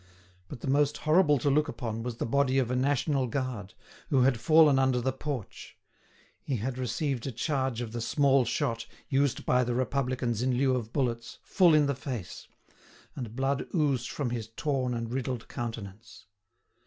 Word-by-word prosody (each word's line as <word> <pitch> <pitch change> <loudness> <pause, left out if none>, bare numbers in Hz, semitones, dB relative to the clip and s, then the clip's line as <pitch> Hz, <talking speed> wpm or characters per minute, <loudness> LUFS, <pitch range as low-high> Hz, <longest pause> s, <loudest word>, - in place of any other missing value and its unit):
But 115 - -9
the - - -5
most 145 +2 +2
horrible 155 -2 +4
to 140 +3 +1
look 150 +2 +2
upon 115 -6 -4
was 120 0 -5
the - - -2
body 135 +2 +2
of 125 -2 +1
a - - 0
national 135 +1 +1
guard, 120 -5 -4 0.3
who 135 -3 +3
had 125 -3 +3
fallen 155 -1 +5
under 130 -2 +2
the 130 +2 -1
porch; 135 -5 -6 0.6
he 135 - -2
had 125 +3 -3
received 130 +1 -2
a - - -2
charge 130 -1 -1
of 115 -2 -5
the 120 0 -4
small 135 +2 +3
shot, 115 -1 -2 0.2
used 140 -2 +1
by 125 0 +3
the 120 0 -2
Republicans 125 -3 -1
in 130 0 +1
lieu 130 0 +3
of 115 -3 -4
bullets, 120 -5 -2
full 175 -4 +4
in 150 -1 +5
the 140 - +1
face; 125 -8 -6 0.7
and 120 -5 -6
blood 135 +1 -1
oozed 140 -7 +1
from 135 -5 -3
his 115 -3 -3
torn 130 +1 -2
and 115 0 -4
riddled 125 -2 -3
countenance. 115 -3 -7
130 Hz, 180 wpm, -29 LUFS, 120-140 Hz, 0.7 s, fallen